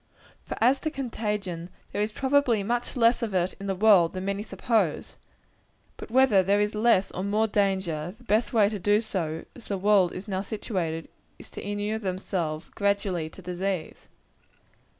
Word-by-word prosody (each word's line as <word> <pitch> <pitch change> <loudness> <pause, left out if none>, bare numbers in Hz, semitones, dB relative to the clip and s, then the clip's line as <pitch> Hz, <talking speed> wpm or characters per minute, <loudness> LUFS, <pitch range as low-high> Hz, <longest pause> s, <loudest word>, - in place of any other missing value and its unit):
For - - -5
as 255 +4 +4
to 310 - -2
contagion, 210 - -4 0.2
there - - -2
is 210 +1 0
probably 265 -4 +2
much 240 +4 -2
less 235 +1 +4
of 220 -5 -2
it 180 0 +1
in 200 - -6
the 195 - 0
world 190 -4 +5
than 185 0 -4
many 200 +1 -1
suppose. 215 -6 -1 0.8
But - - -9
whether 250 -5 +5
there 200 +2 +2
is 210 +1 +1
less 215 -3 +3
or 185 - -4
more 210 +2 +2
danger, 190 -5 -1
the 245 - -19
best 220 0 +1
way 220 -5 +4
to 210 -1 -3
do, 205 +3 +3
as 195 0 -3
the 200 - -2
world 195 -2 +3
is 185 +3 -7
now 190 -2 -1
situated, 185 -6 -3 0.3
is, - - -12
to - - -7
inure 205 +2 -3
ourselves, 180 -4 -3
gradually, 200 -5 0
to 190 - -14
disease. 180 -1 -4
200 Hz, 170 wpm, -27 LUFS, 185-220 Hz, 0.8 s, world